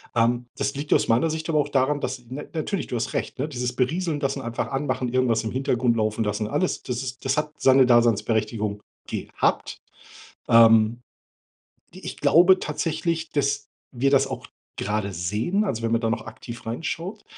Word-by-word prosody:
Ähm, 120 +1 +2
das 140 - -2
liegt 145 +1 -1
aus - - +3
meiner 125 +8 +2
Sicht 160 +1 -4
aber 155 - +2
auch 145 0 0
daran, 140 +1 +1
dass - - -3
n 130 +5 -8
natürlich, 170 +4 -2
du 125 - -4
hast 115 - -2
recht, - - -3
dieses 125 -2 -2
Berieseln 155 +4 0
lassen, 140 -1 -2
einfach 120 -1 -3
Anmachen, 135 -3 -1
irgendwas 125 -3 +2
im 110 - -3
Hintergrund 125 -3 +1
laufen 110 0 0
lassen, 105 0 -2
alles, 185 +11 -1
das 125 -1 -3
ist 130 -1 -7
das - - +1
hat 150 0 -1
seine 130 -1 +5
Daseinsberechtigung 110 -3 +2 0.3
gehabt. - - -2 0.7
Ähm, 115 0 +6 0.9
ich - - -8
glaube 180 +3 +6
tatsächlich, 165 +2 -2
dass 140 -1 -1 0.2
wir 135 +2 +1
das 140 - +4
auch - - -6 0.3
gerade 105 -1 -2
sehen 105 - -1
also 115 - -2
wenn 115 0 0
man 115 - +2
da 115 - 0
noch 115 - -2
aktiv 115 +1 -9
reinschaut, 165 - -4
125 Hz, 175 wpm, -24 LUFS, 115-145 Hz, 0.9 s, Ähm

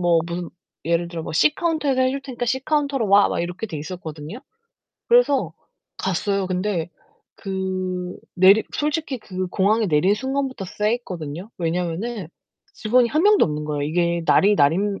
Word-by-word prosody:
뭐 170 -2 +3
문 175 -1 -4 0.4
예를 170 +1 0
들어 170 -1 -5
뭐 - - -6
"C 300 - +4
카운터에서 310 -7 0
해 255 0 +3
줄테니까 260 -3 -4
C 265 +3 0
카운터로 280 -5 0
와." 200 +1 +6
막 - - -2
이렇게 180 +5 -4
돼 165 -7 -6
있었거든요. 160 - -7 0.7
그래서 285 - +3 0.4
갔어요. 195 +1 -1
근데 180 -2 -2 0.4
그 185 -2 -3 0.2
내리 195 +4 +6
솔직히 295 -3 -1
그 185 -3 -5
공항에 205 +4 +1
내린 180 +5 +3
순간부터 265 -3 -3
쎄했거든요. 190 -5 -3
왜냐면은 180 +4 -3 0.5
직원이 235 +2 +2
1 310 +5 +1
명도 415 +1 +5
없는 150 0 -4
거예요. 150 -1 -2
이게 170 +3 0
날이 205 +3 +5
날인 195 +6 +2
195 Hz, 330 characters per minute, -22 LUFS, 170-245 Hz, 0.7 s, 와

